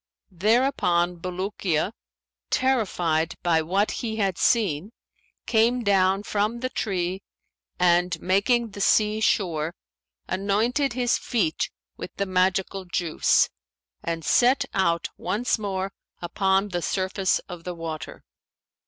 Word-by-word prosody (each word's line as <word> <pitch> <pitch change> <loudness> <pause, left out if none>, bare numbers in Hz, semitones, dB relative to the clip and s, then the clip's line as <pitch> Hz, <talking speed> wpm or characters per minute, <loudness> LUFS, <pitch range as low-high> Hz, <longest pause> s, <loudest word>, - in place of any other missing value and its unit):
Thereupon 180 -4 +2
Bulukiya, 185 -1 -2 0.6
terrified 175 -11 +1
by 165 -2 +3
what 195 +6 +1
he 220 -2 -3
had 195 -4 0
seen, 200 -3 +1 0.5
came 235 +2 +2
down 195 -1 +3
from 215 +3 -1
the 255 0 -2
tree 185 -2 -2 0.6
and, 175 -1 +2
making 215 +6 +1
the 200 - -7
sea 215 +1 +3
shore, 170 -7 0 0.5
anointed 220 +8 0
his 245 -1 +1
feet 255 +6 -1 0.3
with - - -6
the 200 - -1
magical 185 +1 0
juice, 175 -2 +2 0.5
and 165 -2 -4
set 255 +2 +4
out 170 -3 +1
once 220 +6 -1
more 195 -2 -3 0.3
upon 190 +3 +1
the 175 -2 -2
surface 190 +1 0
of 175 -3 -9
the 180 0 -5
water. 165 -2 -7
190 Hz, 115 wpm, -25 LUFS, 175-220 Hz, 0.6 s, set